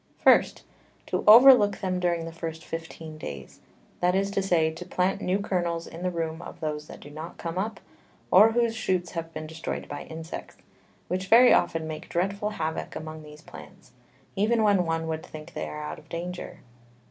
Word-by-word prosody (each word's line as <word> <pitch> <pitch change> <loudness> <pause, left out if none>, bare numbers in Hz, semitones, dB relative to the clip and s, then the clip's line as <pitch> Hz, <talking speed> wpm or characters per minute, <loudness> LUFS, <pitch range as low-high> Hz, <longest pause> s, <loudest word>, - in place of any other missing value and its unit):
First, - - +4 0.4
To - - -2
over 245 +5 +11
look 205 -5 +2
them 185 -1 -2
during 170 -2 0
the 165 - -6
first 165 -1 -6
fifteen 160 -1 -7
Days; 70 - -8 0.4
that 180 +1 +2
is 195 +1 +1
to 200 - 0
say, 170 -4 +2
to 165 +3 -8
plant 185 +3 -1
new 185 0 +1
Kernels 175 -4 -2
in 165 - -10
the 180 - 0
room 165 -1 -3
of - - -10
those 150 -1 -4
that - - -11
do 145 - -11
not 155 +3 -8
come 170 +2 -4
up, 210 0 -3 0.5
or 215 +4 +7
whose 235 -1 +1
Shoots 180 -5 -1
have 165 -1 -5
been 155 -1 -6
destroy'd 160 +1 -5
by 145 - -7
Insects, 160 0 -8 0.5
which 185 +1 -2
very 240 +4 +7
often 160 -1 +1
make 155 +1 -7
dreadful 200 +4 -1
Havock 160 -6 -4
among 155 0 -7
these 150 0 -13
Plants, 185 -5 -13 0.4
even 220 +3 +2
when 200 -5 +3
one 165 0 -1
would 160 0 -3
think 155 +2 -10
they - - -4
are 150 0 -6
out 150 - -6
of 155 - -20
danger. 175 +2 -6
170 Hz, 195 wpm, -26 LUFS, 160-195 Hz, 0.5 s, over